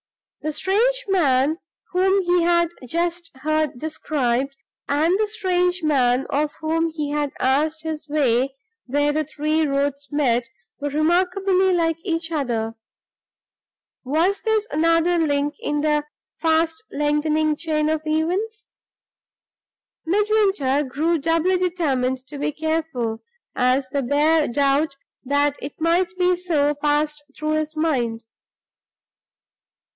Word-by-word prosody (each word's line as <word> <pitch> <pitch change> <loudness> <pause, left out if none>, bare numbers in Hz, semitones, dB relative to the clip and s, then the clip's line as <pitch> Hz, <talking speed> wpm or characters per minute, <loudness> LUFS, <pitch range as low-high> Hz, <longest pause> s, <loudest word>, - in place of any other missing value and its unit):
The 310 - -2
strange 470 +10 +1
man 305 -4 +2 0.3
whom 380 +2 +2
he 355 0 +2
had 340 0 +3 0.2
just 340 +3 -2
heard 310 0 -1
described, 275 -3 -1 0.3
and 320 +7 +2
the 430 - +2
strange 360 -4 0
man 260 -4 +2
of 295 +1 0
whom 325 +1 0
he 300 -2 -4
had 295 -1 -1
asked 305 +4 +1
his 310 -2 -5
way 270 -2 +1 0.3
where 290 +3 +1
the 310 +1 +1
three 310 +1 0
roads 280 0 -1
met, 245 -5 +1 0.3
were 290 - -2
remarkably 365 +5 +2
like 330 -2 +1
each 330 -3 -2
other. 235 -7 -1 1.3
Was 330 +9 +1
this 440 -1 0
another 330 +2 +3
link 290 -2 +1
in 295 0 -1
the 300 -1 +1 0.3
fast 325 +3 +1
lengthening 300 +1 +1
chain 305 -1 -1
of 310 0 0
events? 360 +9 -1 1.4
Midwinter 390 -8 +2
grew 310 +5 0
doubly 330 +4 +1
determined 265 -8 0
to 285 +1 -9
be 295 - 0
careful, 310 -8 -2 0.3
as 255 +2 +2
the 280 +1 -1
bare 295 +4 +3
doubt 280 +3 +1 0.3
that 285 +1 +1
it 280 - -7
might 345 +3 +1
be 360 0 +3
so 315 -5 +1
passed 295 0 0
through 305 0 -2
his 310 0 -1
mind. 245 -8 0
310 Hz, 120 wpm, -22 LUFS, 285-340 Hz, 1.4 s, had